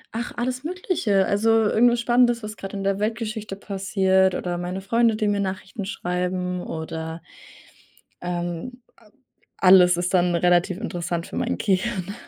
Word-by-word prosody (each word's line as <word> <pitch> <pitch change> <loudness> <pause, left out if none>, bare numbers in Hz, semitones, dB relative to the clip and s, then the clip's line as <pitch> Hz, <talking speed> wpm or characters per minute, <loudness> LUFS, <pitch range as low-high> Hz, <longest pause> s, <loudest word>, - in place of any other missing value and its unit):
Ach, 235 +2 -3
alles 255 +2 -2
Mögliche. 315 - 0
Also, 205 +4 +1
irgendwas 225 +2 +4
Spannendes, 240 -1 +3
was 215 0 -6
grad 195 -1 -8
in 195 - -4
der 195 0 0
Weltgeschichte 215 -1 -3
passiert 190 -1 +1
oder 175 -1 -3
meine 180 +2 -4
Freunde, 230 +3 +2
die 215 -1 -1
mir 205 -1 +1
Nachrichten 195 +2 -4
schreiben 180 -2 -2
oder 160 0 -5 1.0
ähm, 175 +7 -4 0.2
a 220 - -22 0.5
alles 185 -2 +6
ist 175 +1 -2
dann 175 -1 +3
relativ 175 +1 +2
interessant 175 -5 -4
für - - -7
mein - - -1
Gehirn. 195 -1 -1
195 Hz, 145 wpm, -23 LUFS, 180-225 Hz, 1.0 s, alles